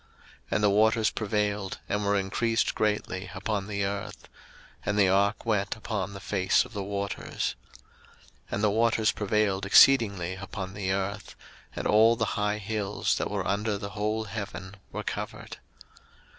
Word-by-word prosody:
01:007:018 - - -32 0.4
And 105 - 0
the 105 - +5
waters 110 +2 +4
prevailed, 105 -2 -1
and 105 0 -1
were 100 0 +2
increased 115 +4 0
greatly 105 -3 -1
upon 100 +1 -2
the 100 -1 -1
earth; 100 0 -5 0.6
and 105 +1 -1
the 100 -2 +5
ark 100 +4 +2
went 105 -3 0
upon 100 -3 -4
the 100 - -7
face 95 +1 +2
of 125 - -13
the 100 - -3
waters. 100 0 -3 0.9
01:007:019 - - -37
And 100 - -2
the 105 - +5
waters 115 0 +3
prevailed 105 -2 0
exceedingly 100 -7 +5
upon 95 0 -6
the 95 -1 -2
earth; 100 +2 -3 0.4
and - - -4
all 110 +2 +5
the 115 -1 0
high 105 0 0
hills, 105 -1 -1
that - - -1
were - - -2
under 105 +1 0
the 100 0 -6
whole 110 +1 -1
heaven, 100 -2 -6 0.2
were - - -4
covered. - - -5
105 Hz, 160 wpm, -28 LUFS, 100-110 Hz, 0.9 s, the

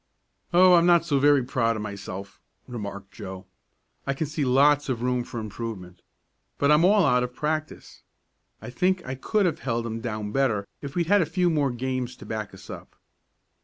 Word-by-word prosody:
"Oh, 180 +1 +6
I'm 170 0 +5
not 170 -2 +5
so 145 -4 +1
very 145 -1 +4
proud 115 -3 0
of 105 - -4
myself," 100 -1 -7 0.3
remarked 100 -4 -7
Joe. 95 -2 -8 0.6
"I 140 - 0
can 160 - -2
see 150 0 -3
lots 140 +3 +3
of 120 -2 -2
room 125 -1 0
for 120 - -7
improvement. 105 -5 -7 0.6
But 140 +1 +3
I'm 150 +2 +5
all 200 0 +5
out 125 -4 +3
of 125 0 -4
practice. 155 0 -4 0.6
I - - -7
think 185 +5 0
I 130 - -4
could 200 +10 0
have 170 - 0
held 115 -1 -2
'em 115 0 -4
down 105 -3 -4
better 115 -6 +1 0.2
if 140 -1 -7
we'd 175 -1 +1
had 205 +3 +4
a - - +2
few 175 +1 +1
more 145 -3 +1
games 125 0 -3
to - - -13
back 110 -2 -4
us 95 -1 -14
up." - - -10
130 Hz, 195 wpm, -25 LUFS, 115-155 Hz, 0.6 s, Oh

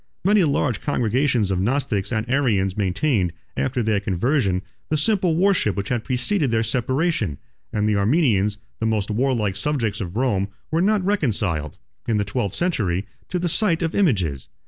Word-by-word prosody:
Many 205 0 +5
large 140 -6 0
congregations 125 -5 +1
of 95 - 0
Gnostics 115 -2 0
and 110 -1 -1
Arians 110 -8 +1
maintained, 100 - 0 0.2
after 125 -2 -1
their 110 -2 +1
conversion, 100 - 0 0.3
the 155 - +1
simple 180 0 +2
worship 180 - +2
which 100 +1 -3
had 120 -3 -1
preceded 135 - +1
their 115 0 +1
separation; 125 - 0 0.3
and 105 0 0
the 105 -1 +2
Armenians, 105 - +2 0.2
the 110 - 0
most 110 -1 0
warlike 110 -4 0
subjects 115 -4 -1
of 90 -1 -5
Rome, 105 -7 +1 0.2
were 165 +2 +2
not 200 0 +2
reconciled, 105 - 0 0.3
in 115 -2 +1
the 100 - 0
twelfth 100 -2 -2
century, 105 - 0 0.2
to 180 - -1
the 175 0 -1
sight 170 -1 +1
of 165 - -1
images. 90 - 0
115 Hz, 165 wpm, -22 LUFS, 100-150 Hz, 0.3 s, Many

